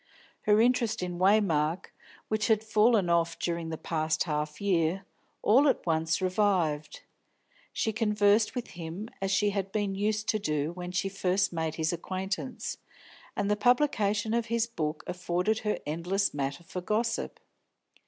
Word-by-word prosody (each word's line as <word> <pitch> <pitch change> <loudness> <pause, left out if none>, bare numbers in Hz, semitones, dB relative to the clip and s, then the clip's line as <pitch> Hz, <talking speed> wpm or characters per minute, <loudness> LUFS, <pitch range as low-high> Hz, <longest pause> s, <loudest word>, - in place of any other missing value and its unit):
Her 210 0 +5
interest 235 -3 +2
in 175 -1 -4
Waymark, 185 -4 +2 0.4
which 215 -1 0
had 220 -1 +3
fallen 220 -2 +3
off 170 -1 +1
during 170 -1 -2
the 160 - -4
past 155 -1 -1
half 150 -2 -3
year, 185 -1 +1 0.4
all 265 +7 +5
at 270 - +1
once 160 +1 0
revived; 180 -6 0 0.7
she 220 - -1
conversed 210 0 +2
with 245 - -4
him 175 +5 -7
as 195 - 0
she 205 +2 +2
had 195 -1 -3
been 205 -2 -1
used 215 +2 -1
to 215 - +2
do 150 -4 -1
when 180 0 -6
she 185 +2 0
first 190 -1 0
made 160 -1 -2
his 160 +1 0
acquaintance, 195 +7 -4 0.6
and 200 - -1
the - - +4
publication 220 -3 +2
of 235 -1 0
his 230 0 +1
book 155 -9 -4
afforded 180 +4 -1
her 210 -1 -1
endless 175 +6 -1
matter 140 +2 -3
for 180 +2 -6
gossip. 225 +4 -1
195 Hz, 155 wpm, -29 LUFS, 165-215 Hz, 0.7 s, Her